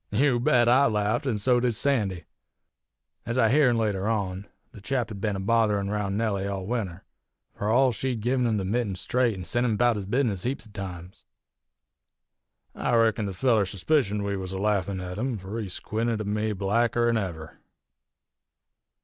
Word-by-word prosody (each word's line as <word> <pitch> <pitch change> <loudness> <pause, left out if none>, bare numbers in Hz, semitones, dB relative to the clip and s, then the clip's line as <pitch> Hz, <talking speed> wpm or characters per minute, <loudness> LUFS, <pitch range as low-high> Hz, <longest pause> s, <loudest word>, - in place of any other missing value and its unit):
"You 125 +3 +2
bet 120 0 +3
I 130 +4 +5
laffed, 105 +4 0
an' 115 -5 0
so 120 +4 +3
did 120 -2 0
Sandy. 105 - 0 1.0
Ez 115 +2 -2
I 115 -3 +4
heern 130 -3 +4
later 105 -3 0
on, 100 -3 -2 0.2
the 105 - -13
chap 125 +2 -1
had 100 -3 -8
ben 105 -2 -1
a - - -3
botherin' 105 -1 +1
roun' 100 -1 -1
Nellie 100 -3 -1
all 95 -2 -4
winter, 100 -5 -3 0.5
fur 105 - -3
all 130 +3 +4
she'd 120 0 -3
gin 125 0 +1
him 110 -2 +1
the 95 - -2
mitten 105 -1 -1
straight 120 +4 0
an' 90 - -6
sent 120 +8 +1
him 120 -3 +1
about 120 +1 +2
his 100 -2 -5
bizness 115 -5 0
heaps 125 +3 -3
o' 110 - -16
times. 90 -2 -8 1.5
I 120 - 0
reckon 115 -2 +2
the - - -3
feller 110 +1 +2
suspicioned 105 - 0
we 100 0 -2
was 95 -1 -5
a - - -3
laffin' 100 -2 0
at 90 +2 -6
him, 125 -1 -1
fur 100 +4 -6
he 100 - -5
squinted 110 +4 -2
at 105 - -3
me 105 +1 -1
blacker 115 +4 +1
'n 115 -1 +2
ever. 85 -7 -5
105 Hz, 185 wpm, -26 LUFS, 100-120 Hz, 1.5 s, I